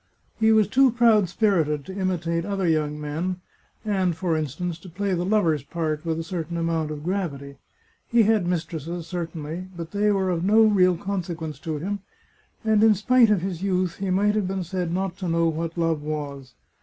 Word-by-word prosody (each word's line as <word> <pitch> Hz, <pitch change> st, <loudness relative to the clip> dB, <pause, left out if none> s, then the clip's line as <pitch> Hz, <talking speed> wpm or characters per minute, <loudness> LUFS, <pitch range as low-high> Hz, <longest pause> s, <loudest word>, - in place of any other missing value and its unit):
He 220 Hz, 0 st, +4 dB
was 215 Hz, -3 st, +4 dB
too 265 Hz, +4 st, +5 dB
proud 225 Hz, -5 st, +4 dB
spirited 165 Hz, -8 st, +1 dB
to 190 Hz, -, -7 dB
imitate 175 Hz, -3 st, -1 dB
other 195 Hz, -1 st, -1 dB
young 150 Hz, -2 st, 0 dB
men, 165 Hz, +5 st, -3 dB, 0.5 s
and, 190 Hz, -5 st, +1 dB
for 170 Hz, -2 st, 0 dB
in 155 Hz, -1 st, 0 dB
stance, 170 Hz, +4 st, -5 dB
to 185 Hz, -, -12 dB
play 195 Hz, +3 st, -2 dB
the 175 Hz, -1 st, 0 dB
lover's 180 Hz, -7 st, +2 dB
part 155 Hz, +1 st, -3 dB
with 165 Hz, -1 st, -1 dB
a 165 Hz, -, -3 dB
certain 170 Hz, 0 st, -4 dB
amount 165 Hz, -2 st, -1 dB
of 150 Hz, -1 st, -6 dB
gravity. 150 Hz, -7 st, -3 dB, 0.5 s
He 235 Hz, -1 st, +4 dB
had 215 Hz, -4 st, +2 dB
mistresses, 170 Hz, -1 st, -3 dB
certainly, 165 Hz, 0 st, -5 dB
but 165 Hz, -1 st, -6 dB
they 205 Hz, +1 st, +1 dB
were 190 Hz, -2 st, +1 dB
of 170 Hz, -1 st, -1 dB
no 215 Hz, +4 st, +5 dB
real 185 Hz, -5 st, +4 dB
consequence 170 Hz, -5 st, -4 dB
to 160 Hz, -2 st, -4 dB
him, 200 Hz, +7 st, -3 dB, 0.7 s
and 215 Hz, -1 st, +4 dB
in 220 Hz, -1 st, +6 dB
spite 235 Hz, +3 st, +4 dB
of 205 Hz, -4 st, +3 dB
his 180 Hz, -2 st, -4 dB
youth 185 Hz, -3 st, 0 dB
he 195 Hz, -1 st, -3 dB
might 205 Hz, +3 st, +2 dB
have 210 Hz, -3 st, 0 dB
been 190 Hz, 0 st, -2 dB
said 180 Hz, -1 st, -3 dB
not 185 Hz, 0 st, -2 dB
to 185 Hz, -, -4 dB
know 165 Hz, 0 st, +2 dB
what 165 Hz, +1 st, -3 dB
love 165 Hz, -2 st, +1 dB
was. 140 Hz, -4 st, -5 dB
175 Hz, 195 wpm, -24 LUFS, 160-195 Hz, 0.7 s, in